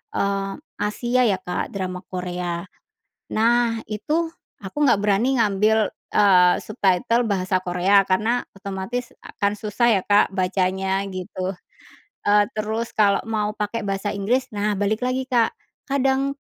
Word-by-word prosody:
eee, 195 0 0 0.3
Asia 240 +4 0
ya 195 - +3
Kak, 180 +2 -4
drama 185 -1 -3
Korea. 180 -1 -4 0.7
Nah, 235 +1 +3
itu 315 +10 -2 0.2
aku 195 +6 -10
nggak - - +5
berani 225 +6 +2
ngambil, 215 0 +2 0.2
eee, 180 -3 +6
subtitle 215 +4 +1
bahasa 185 -1 0
Korea 185 +2 +3
karena 220 +6 +2 0.2
otomatis 200 +5 -5
akan 200 0 -2
susah 210 0 +1
ya, - - -13
Kak, 205 -1 +4
bacanya 190 +1 0
gitu, 185 0 -4 0.7
eee, 205 0 +5
terus 220 +2 -2
kalau 205 -2 +4
mau 210 -1 -1
pakai 210 +1 -3
bahasa 195 +1 -2
Inggris. 250 +6 0
Nah, 210 +1 0
balik 215 +4 0
lagi, 260 +1 -1
Kak, 235 -3 +2 0.3
kadang, 270 0 +1
205 Hz, 130 wpm, -23 LUFS, 190-230 Hz, 0.7 s, eee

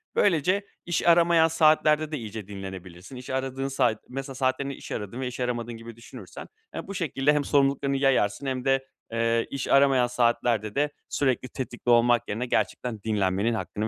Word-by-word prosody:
Böylece 185 +2 +2 0.2
iş 175 0 -1
aramayan 170 -1 +5
saatlerde 155 -1 +3
de 155 - -2
iyice 110 -4 -7
dinlenebilirsin. 95 +1 -9
İş 125 0 -9
aradığın 130 0 -2
saat 120 -5 0
mesela 135 +1 -6
saatlerini 135 +1 -1
iş - - -11
aradığın 105 +4 -5
ve 130 - -2
iş 125 - -7
aramadığın 120 -1 -2
gibi 115 0 -10
düşünürsen, 115 -4 -11 0.3
eee, - - -6
bu 200 - -6
şekilde 150 -4 +1
hem 150 -1 +1
sorumluluklarını 140 -1 +1
yayarsın 135 -3 +1
hem 130 -1 -3
de, 135 0 +2 0.3
eee, 115 0 +1
iş 140 -1 -3
aramayan 135 -3 +4
saatlerde 120 -3 0
de 145 +1 +2 0.2
sürekli 130 -2 0
tetikte 125 -1 -5
olmak 120 0 +4
yerine 115 +5 -2
gerçekten 120 -2 -2
dinlenmenin 105 0 0
hakkını 110 -1 -3
130 Hz, 170 wpm, -26 LUFS, 115-140 Hz, 0.3 s, aramayan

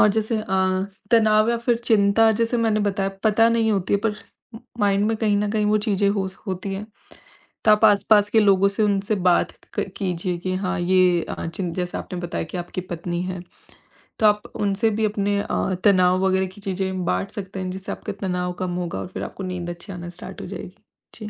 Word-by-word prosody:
और 210 - +7
जैसे 220 +2 0
अ, 190 -1 0 0.3
तनाव 215 -1 +5
या 235 - +1
फिर 235 0 +1
चिंता 220 -1 +4
जैसे 230 +1 +1
मैंने 220 -2 +2
बताया 200 -1 0 0.2
पता 225 +2 +4
नहीं 230 -1 +2
होती 195 0 0
है 200 - +1
पर 210 - 0 0.7
माइंड 200 0 +2
में 225 +1 0
कहीं 215 -2 +1
न 205 0 0
कहीं 215 -1 +1
वो 210 +1 +3
चीजें 200 -1 +2
हो 200 -2 -1
स 190 - -13
होती 190 +1 -3
हैं 205 +2 -6 0.8
तो 215 - +5
आप 210 +1 +4
आसपास 205 0 +4
के 220 - +4
लोगों 200 -1 +4
से 200 +2 -1
उनसे 200 0 +1
बात 175 - +2 0.3
क - - +2
कीजिए 180 -2 -2
कि 185 +1 -3
हाँ, 190 0 -2
ये 180 -1 +3
अ, - - -4
चीन 170 +1 -4
जैसे 180 -1 -3
आपने 180 - -6
बताया 175 -1 -3
कि - - -5
आपकी 175 +1 -4
पत्नी 175 +1 -3
है, 185 -1 -4 0.8
तो 220 - +3
आप 210 0 +3
उनसे 205 +2 +1
भी 220 - +3
अपने 205 -1 0
अ, 190 - -1
तनाव 185 -2 +5
वगैरह 190 0 +2
की 205 - -14
चीजें 190 -1 -2
बाँट 195 +3 -1
सकते 195 -3 -6
हैं 185 - -3
जिससे 190 +1 -6
आपका - - -6
तनाव 180 -1 -1
कम 180 -1 -2
होगा 170 - -4
और - - -5
फिर 185 - -6
आपको 195 - -7
नींद 180 -2 -4
अच्छी 175 +3 -9
आना 175 -1 -7
स्टार्ट 180 +2 -9
हो - - -6
जाएगी। 185 -1 -8 0.4
जी। 215 -2 -7
195 Hz, 215 wpm, -23 LUFS, 185-210 Hz, 0.8 s, और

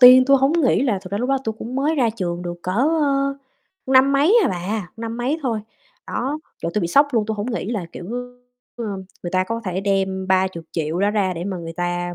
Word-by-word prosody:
tiên 255 0 +10
tui 275 +1 +6
hông 270 +3 +3
nghĩ 310 -7 +3
là 235 -8 +1
thật 185 - -8
ra 200 - 0
lúc 250 +3 -1
đó 275 - +2
tui 220 - -1
cũng 245 +3 -6
mới 290 +4 +1
ra 250 -6 +2
trường 180 -5 -3
được 175 -1 -4
cỡ, 185 - -2 0.3
ơ, 275 -1 +1 0.5
năm 265 +1 +5
mấy 305 +12 +5
à - - +3
bà, 185 +1 -3
năm 230 0 -5
mấy 255 +6 -1
thôi, 230 -4 -1 0.5
đó. 275 +5 -2 0.2
Trời, 165 - -1
tui 210 - +2
bị 170 - -1
sốc 280 +11 +5
luôn, 220 -3 +1
tui 220 - -1
hông 210 +4 -3
nghĩ 225 - -3
là, 210 -7 -2
kiểu, - - -8 0.7
ờ, 235 - -4 0.4
người 175 - -4
ta 185 0 +2
có 230 +4 -3
thể 185 0 -2
đem 190 -1 0
30.000.000, 170 -4 0
đó 200 +2 +2
ra 200 -3 +1
để 170 - -4
mà 195 -1 -3
người 165 -1 -6
ta 175 0 -2
215 Hz, 235 wpm, -21 LUFS, 185-260 Hz, 0.7 s, tiên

